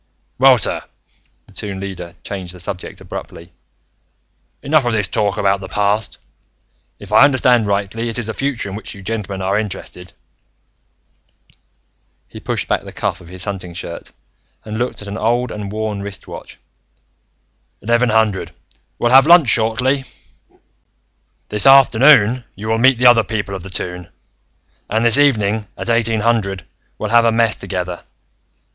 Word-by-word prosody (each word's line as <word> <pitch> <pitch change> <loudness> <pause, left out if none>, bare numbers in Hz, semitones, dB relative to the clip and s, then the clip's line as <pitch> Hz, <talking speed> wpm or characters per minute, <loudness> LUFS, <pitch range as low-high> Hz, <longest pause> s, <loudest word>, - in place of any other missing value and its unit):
"Well, 130 -1 +7
sir," 100 - +1 0.6
the - - -21
Toon 100 -2 -6
Leader 95 -3 -7
changed 95 -3 -7
the - - -12
subject 90 +1 -6
abruptly, 85 +1 -9 1.1
"enough 150 0 +3
of 120 -1 -1
this 105 -3 +1
talk 105 -1 -1
about 100 -1 +1
the 95 - -8
past. 105 +1 -1 0.8
If 105 -1 -13
I 110 - +7
understand 125 -5 +3
rightly, 100 +3 -2
it 115 - -4
is 120 - -2
the 110 - -3
future 135 -5 -3
in 95 - -7
which 110 - -8
you 100 - -12
gentlemen 100 -3 -4
are 100 +2 +1
interested." 90 -4 -7 2.1
He - - -11
pushed - - -3
back - - 0
the - - -11
cuff - - -3
of 85 - -14
his 90 +1 -7
hunting 95 -4 -6
shirt 85 -1 -8 0.5
and 110 +1 -5
looked 120 -3 -3
at - - -9
an 100 +2 -5
old 120 +2 0
and 105 -1 -6
worn 110 -1 -3
wrist 100 -1 -8
watch. - - -10 1.3
"Eleven 120 +3 +2
hundred: 110 -3 +1 0.5
we'll 120 - 0
have 135 +2 +7
lunch 170 -6 +7
shortly. 125 +5 +1 1.4
"This 105 +5 +3
afternoon, 130 -2 +6
you 110 +3 -6
will 115 0 +1
meet 130 +1 +4
the 125 - 0
other 120 -2 +7
people 105 -2 -4
of 95 - -5
the 95 - -9
Toon, 90 -1 -5 0.8
and 110 +2 0
this 115 +4 +4
evening, 110 -7 +2
at 120 - -2
eighteen 115 -1 +2
hundred, 105 -5 0 0.3
we'll 105 - -4
have 120 0 +5
a 115 - +4
mess 115 -1 +2
together. 90 -2 -5
110 Hz, 160 wpm, -18 LUFS, 100-120 Hz, 2.1 s, Well